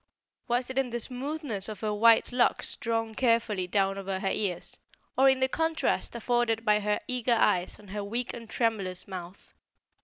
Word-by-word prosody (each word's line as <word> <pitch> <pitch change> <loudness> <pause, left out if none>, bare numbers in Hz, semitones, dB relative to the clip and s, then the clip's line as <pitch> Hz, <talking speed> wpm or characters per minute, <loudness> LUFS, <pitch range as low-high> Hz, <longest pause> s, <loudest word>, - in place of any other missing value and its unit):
Was 245 +2 0
it 260 - 0
in 265 -2 0
the 240 0 -3
smoothness 255 - -3
of 215 - -7
her 215 -1 -1
white 230 +3 +5
locks 245 0 +1
drawn 225 -1 -2
carefully 225 -6 +1
down 195 +1 +1
over 195 -1 -3
her 195 - -1
ears, 190 -5 -2 0.4
or 270 +1 +6
in 265 0 +2
the 260 - +4
contrast 320 -2 -1
afforded 235 -1 0
by 210 -1 +4
her 210 0 0
eager 250 -2 +1
eyes 180 -5 +2
and 205 -2 -14
her 205 0 -3
weak 235 +5 -2
and 230 -2 -9
tremulous 200 -6 -1
mouth? 185 -1 -9
225 Hz, 180 wpm, -28 LUFS, 200-245 Hz, 0.4 s, or